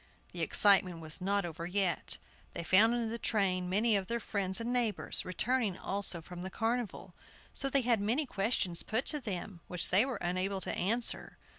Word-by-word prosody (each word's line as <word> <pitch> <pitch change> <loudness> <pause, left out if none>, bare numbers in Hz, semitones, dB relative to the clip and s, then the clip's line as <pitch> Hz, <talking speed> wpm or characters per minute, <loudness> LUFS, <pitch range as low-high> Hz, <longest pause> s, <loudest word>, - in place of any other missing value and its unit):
The - - -5
excitement 190 -4 +5
was 160 +2 -3
not 200 +2 0
yet - - -3
over. 170 +1 -7 0.8
They 170 - -5
found 215 +7 +5
in 235 -2 -1
the 230 +1 -4
train 185 -5 0
many 215 +4 +3
of 195 -2 -1
their 235 +2 -1
friends 195 -4 -2
and 235 +2 -2
neighbors, 235 -4 -1
returning 215 +1 0
also 190 -4 -1
from 175 +1 -9
the 190 - -5
Carnival; 225 -4 -3 0.4
so 275 - 0
they 275 0 +4
had 235 -4 +2
many 240 +9 +1
questions 195 -6 0
put 225 +4 -1
to 300 - -1
them 195 -6 -6
which 180 -1 +1
they 190 +5 +5
were 260 -1 -3
unable 185 +2 -2
to - - -1
answer. 230 +6 -2
200 Hz, 185 wpm, -32 LUFS, 185-235 Hz, 0.8 s, excitement